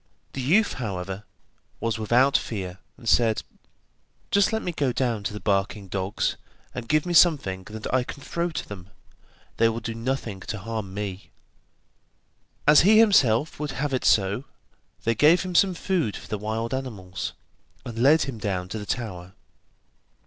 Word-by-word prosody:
The 135 - -3
youth, 185 - +3
however, 95 -1 -4 0.5
was 115 -1 -1
without 125 +6 +3
fear, 95 -4 -2 0.2
and 115 - -11
said: 110 -1 +3 0.9
'Just 200 -1 +4
let 220 0 -1
me 180 - -2
go 140 -5 0
down 120 -4 -1
to - - -1
the 105 - -6
barking 100 0 -1
dogs, 95 +2 -1 0.4
and 120 -2 -6
give 155 -1 +3
me 175 - -2
something 135 - +4
that 110 0 -8
I 130 -1 +3
can 140 +2 -9
throw 170 +3 -2
to 160 - -5
them; 95 -2 -9 0.7
they 115 0 +4
will 115 +1 -3
do 115 - -5
nothing 115 -3 -3
to 105 - -5
harm 110 -1 -5
me.' 100 -2 -5 1.4
As 150 0 +8
he 210 +5 +6
himself 150 - +4
would 150 -1 -3
have 145 0 -2
it 130 - 0
so, 100 +6 +2 0.6
they 115 - +2
gave 155 - +5
him 185 -1 -5
some 185 +1 +4
food 170 - -1
for - - -11
the 105 - -3
wild 110 +3 -3
animals, 105 -9 -5 0.5
and 115 -2 -6
led 145 +6 +5
him 135 -5 -5
down 95 -3 -2
to 110 - -4
the 105 - -8
tower. 95 -7 -4
115 Hz, 170 wpm, -25 LUFS, 100-145 Hz, 1.4 s, As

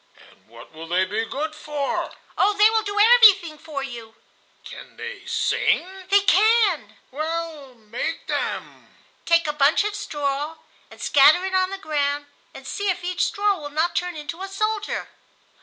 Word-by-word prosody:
"And - - -27
what 115 +1 -14
will 160 +1 -9
they 180 +3 +1
be 215 +4 -2
good 305 +6 -4
for?" 295 -2 -3 0.2
"Oh, 410 +2 +3
they 425 +1 +6
will 445 0 +2
do 410 -1 -3
everything 410 -8 +6
for 285 -3 -6
you!" 230 -4 -9 0.5
"Can - - -12
they 475 +1 -8
sing?" 375 +1 -1
"They 400 0 +5
can." 410 -3 +3
"Well, 310 -2 -5
make 230 +8 -5
them." - - -5 0.3
"Take 335 0 +4
a 300 - -1
bunch 295 +5 +3
of 420 0 -2
straw 295 -5 -3 0.3
and - - -15
scatter 300 +6 +5
it 380 - -4
on 370 0 +2
the 390 - -5
ground, 290 -4 -2 0.3
and - - -12
see 405 -1 -3
if 365 -1 -2
each 360 0 -1
straw 405 -2 0
will 290 -1 -7
not 320 +4 -1
turn 360 -1 -2
into 310 +4 -7
a 385 - -4
soldier." 425 +2 -2
330 Hz, 170 wpm, -23 LUFS, 285-395 Hz, 0.5 s, they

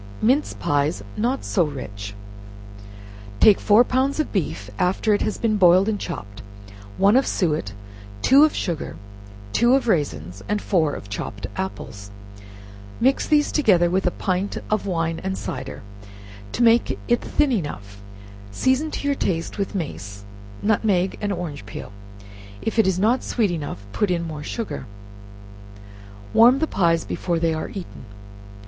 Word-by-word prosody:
Mince 265 +7 +2
Pies 145 -7 0
not 245 +5 -1
so 180 - +2
Rich. 100 -9 -6 1.2
Take 210 - +6
four 215 +3 +5
pounds 260 +4 0
of 310 - -1
beef 105 - -3
after 190 +4 +2
it 205 - +1
has 215 - -1
been 215 -2 +1
boiled 185 +1 +6
and 215 -2 0
chopped, 100 - -7 0.6
one 200 +3 +4
of 265 - +4
suet, 150 - 0 0.5
two 275 +3 +7
of 310 - +3
sugar, 170 -4 -3 0.6
two 240 +2 +4
of 270 - 0
raisins, 95 - -1
and 210 0 +1
four 165 -8 +1
of - - -9
chopped 100 0 -5
apples, 105 - -6 0.9
mix 265 +3 +2
these 295 -1 +3
together 185 - +3
with 190 0 +1
a 180 - -2
pint 185 +1 -1
of 215 -1 0
wine 165 -2 -1
and 190 0 -2
cider, 130 -3 -6 0.7
to 240 - +1
make 230 0 +4
it 240 -1 +2
thin 295 -2 +1
enough, 105 - -4 0.5
season 260 - +1
to 285 - -4
your 285 - +3
taste 165 -5 -2
with 200 0 -2
mace, 100 - -5 0.4
nutmeg 200 -3 +2
and 205 -1 -1
orange 170 - -5
peel; 100 - -8 0.7
if 225 - -2
it 220 - +5
is 190 -2 +1
not 225 +7 +2
sweet 215 -6 0
enough, 145 - -5
put 210 - +1
in 175 -1 0
more 155 -3 -6
sugar. 225 +9 -5 1.5
Warm 240 +4 +7
the 315 - +1
pies 170 - +1
before 175 -2 -2
they 165 0 +1
are 155 - -4
eaten. 185 -9 -8
185 Hz, 155 wpm, -23 LUFS, 150-225 Hz, 1.5 s, two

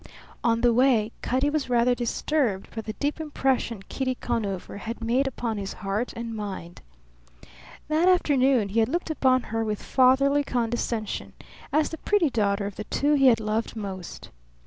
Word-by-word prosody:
On 230 -1 +2
the 240 -1 +4
way 235 -3 +3
Cutty 265 +4 +1
was 295 -4 -1
rather 245 0 +3
disturbed 240 -3 -1
by 225 - -4
the 215 0 -6
deep 295 +6 -2
impression 265 -8 -1
Kitty 260 -1 -2
Conover 205 -7 -3
had 230 +3 -6
made 250 +4 +1
upon 230 -4 -3
his 195 -1 -5
heart 205 +5 -3
and 230 -1 -5
mind. 190 -5 -6 1.1
That 315 +4 +3
afternoon 270 - +3
he 220 +4 +1
had 225 - +2
looked 335 +2 -2
upon 255 -4 +2
her 225 +1 -2
with 215 -2 -3
fatherly 275 +2 +4
condescension, 235 -3 -2 0.4
as 305 +1 +2
the 320 - -7
pretty 375 -9 +2
daughter 200 -3 +1
of 200 -1 -6
the 215 - -5
two 290 +6 +1
he 275 -2 +5
had 235 -3 +5
loved 215 +2 -2
most. 195 -4 -7
240 Hz, 170 wpm, -26 LUFS, 215-275 Hz, 1.1 s, he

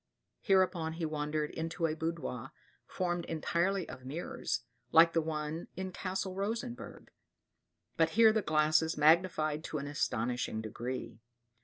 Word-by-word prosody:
Hereupon 185 -5 +2
he 165 0 -3
wandered 150 0 -2
into 165 +1 -2
a 155 - +1
boudoir 155 -6 -4 0.3
formed 175 -1 -1
entirely 170 +4 0
of 130 - -9
mirrors, 140 -2 -3 0.3
like 165 +1 +7
the 165 - +3
one 155 +1 -3
in 190 +1 -4
Castle 185 +1 -3
Rosenburg; 230 +6 -4 0.9
but 160 -1 +4
here 225 -1 +8
the 220 - +2
glasses 155 0 +2
magnified 155 -1 +3
to 155 - -3
an 140 - -4
astonishing 125 -5 -1
degree. 115 +1 -5
160 Hz, 130 wpm, -32 LUFS, 150-185 Hz, 0.9 s, here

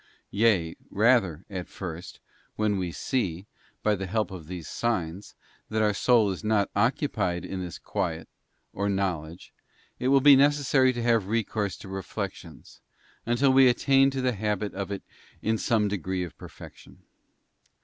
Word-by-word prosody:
Yea, 100 -6 +2
rather, 100 -7 +2
at 90 -3 -6
first, 85 -2 -8 0.4
when 105 -2 0
we 90 -2 -2
see, 95 - -2 0.4
by 105 - +3
the 95 -1 -3
help 110 +2 -1
of 85 -5 -9
these 90 -2 -7
signs, 95 -5 -3 0.3
that 110 0 0
our 105 -1 +2
soul 110 -1 +3
is 95 - -6
not 105 -2 +1
occupied 100 - 0
in 95 -1 -5
this 90 -2 -6
quiet, 80 -2 -3 0.5
or 100 +1 -1
knowledge, 90 -4 -3 0.5
it 125 - -1
will 135 +1 +5
be 140 +1 +8
necessary 140 -2 +4
to 120 -2 -4
have 115 -5 +2
recourse 110 -2 -1
to - - -11
reflections, 95 -1 -7 0.5
until 130 +3 +3
we 135 0 +7
attain 135 +2 +4
to 135 -1 -3
the 130 -1 +1
habit 105 -1 -2
of 100 0 -4
it 100 - -4 0.4
in 110 0 +1
some 110 -3 +2
degree 95 -2 -2
of 85 - -8
perfection. - - -13
105 Hz, 155 wpm, -27 LUFS, 95-120 Hz, 0.5 s, be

